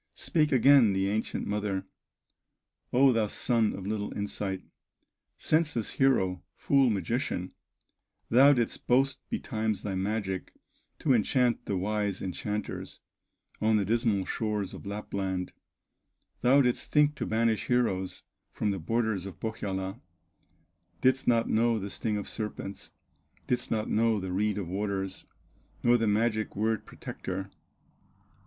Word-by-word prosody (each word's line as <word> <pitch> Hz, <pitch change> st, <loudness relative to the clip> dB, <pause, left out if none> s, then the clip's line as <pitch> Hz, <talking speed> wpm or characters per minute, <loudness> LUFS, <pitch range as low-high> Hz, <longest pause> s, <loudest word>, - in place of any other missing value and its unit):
Spake 155 Hz, -4 st, +1 dB
again 130 Hz, -4 st, +6 dB
the 95 Hz, 0 st, +1 dB
ancient 110 Hz, +1 st, -2 dB
mother: 100 Hz, -2 st, -2 dB, 1.1 s
"O 130 Hz, +1 st, +5 dB
thou 110 Hz, -2 st, +1 dB
son 115 Hz, 0 st, +1 dB
of 95 Hz, -, -7 dB
little 105 Hz, 0 st, -2 dB
insight, 100 Hz, -2 st, -3 dB, 0.7 s
Senseless 150 Hz, -8 st, 0 dB
hero, 95 Hz, -10 st, +2 dB
fool 135 Hz, -2 st, +3 dB
magician, 100 Hz, -2 st, -1 dB, 0.8 s
Thou 135 Hz, +5 st, +7 dB
didst 120 Hz, -4 st, -2 dB
boast 135 Hz, +2 st, +3 dB
betimes 110 Hz, -4 st, -2 dB
thy 100 Hz, -, -2 dB
magic 95 Hz, 0 st, -2 dB, 0.5 s
To 140 Hz, -, +3 dB
enchant 120 Hz, +1 st, +2 dB
the 100 Hz, -, 0 dB
wise 100 Hz, 0 st, -1 dB
enchanters, 105 Hz, +3 st, -4 dB, 0.6 s
On 110 Hz, 0 st, +3 dB
the 100 Hz, -, +1 dB
dismal 110 Hz, -2 st, +1 dB
shores 105 Hz, -3 st, -2 dB
of -, -, -9 dB
Lapland, 95 Hz, -3 st, -3 dB, 0.9 s
Thou 135 Hz, +3 st, +5 dB
didst 125 Hz, -1 st, -1 dB
think 150 Hz, 0 st, +4 dB
to -, -, -3 dB
banish 110 Hz, 0 st, +1 dB
heroes, 100 Hz, -7 st, 0 dB, 0.3 s
From 105 Hz, -, -1 dB
the 95 Hz, -, -3 dB
borders 110 Hz, +1 st, -1 dB
of 95 Hz, -, -10 dB
Pohyola; 100 Hz, -2 st, -4 dB, 1.0 s
Didst 130 Hz, +1 st, +2 dB
not 115 Hz, -1 st, +3 dB
know 115 Hz, +1 st, +2 dB
the 100 Hz, -1 st, -4 dB
sting 110 Hz, -2 st, -1 dB
of 100 Hz, -, -4 dB
serpents, 105 Hz, -2 st, -5 dB, 0.6 s
Didst 125 Hz, -, -1 dB
not 110 Hz, -1 st, -1 dB
know 110 Hz, 0 st, +2 dB
the 95 Hz, -1 st, -4 dB
reed 105 Hz, +2 st, 0 dB
of 100 Hz, -4 st, -3 dB
waters, 95 Hz, 0 st, -3 dB, 0.6 s
Nor 120 Hz, 0 st, +5 dB
the 115 Hz, -, +1 dB
magic 110 Hz, +1 st, +1 dB
word 110 Hz, +1 st, -1 dB
protector! 95 Hz, +1 st, -6 dB
105 Hz, 130 wpm, -29 LUFS, 100-120 Hz, 1.1 s, Thou